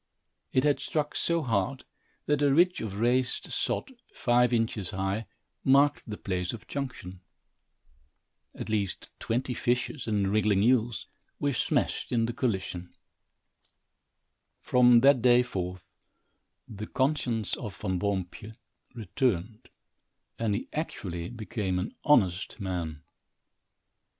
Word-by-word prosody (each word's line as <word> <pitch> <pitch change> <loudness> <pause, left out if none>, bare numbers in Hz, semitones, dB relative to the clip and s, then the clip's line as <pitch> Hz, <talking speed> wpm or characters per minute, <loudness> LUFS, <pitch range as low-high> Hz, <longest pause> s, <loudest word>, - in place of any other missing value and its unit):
It 130 - +2
had 145 -1 +3
struck 150 -1 -2
so 170 -1 +1
hard, 115 +2 -1 0.4
that 150 -1 +1
a 145 -1 +4
ridge 175 +5 +4
of 105 -3 -4
raised 120 +4 +1
sod, - - -1 0.2
five 125 -1 +3
inches 115 -5 0
high, 95 +2 -2 0.4
marked 140 +2 +4
the 105 - -4
place 90 -2 -2
of 115 - -9
junction. 110 -10 -5 1.3
At - - -6
least 105 -4 -2
twenty 125 +2 -1
fishes 125 +3 -1
and 100 -3 +1
wriggling 105 -2 +3
eels 120 -1 +2 0.3
were 145 -1 +1
smashed - - 0
in 115 -2 +2
the 120 - -3
collision. 95 -8 -2 1.7
From 125 -1 +5
that 135 -1 +6
day 125 0 +6
forth 90 -6 -5 0.8
the 105 0 -7
conscience 130 -6 0
of 105 -4 -7
Van 95 -3 -1
Boompjes 100 +2 -3 0.4
returned, 110 -1 -2 0.7
and 110 -3 +1
he 105 - -4
actually 90 - -4
became 105 -5 -3
an 90 +4 -3
honest 100 - +2
man. 85 -6 -4
115 Hz, 120 wpm, -28 LUFS, 95-130 Hz, 1.7 s, that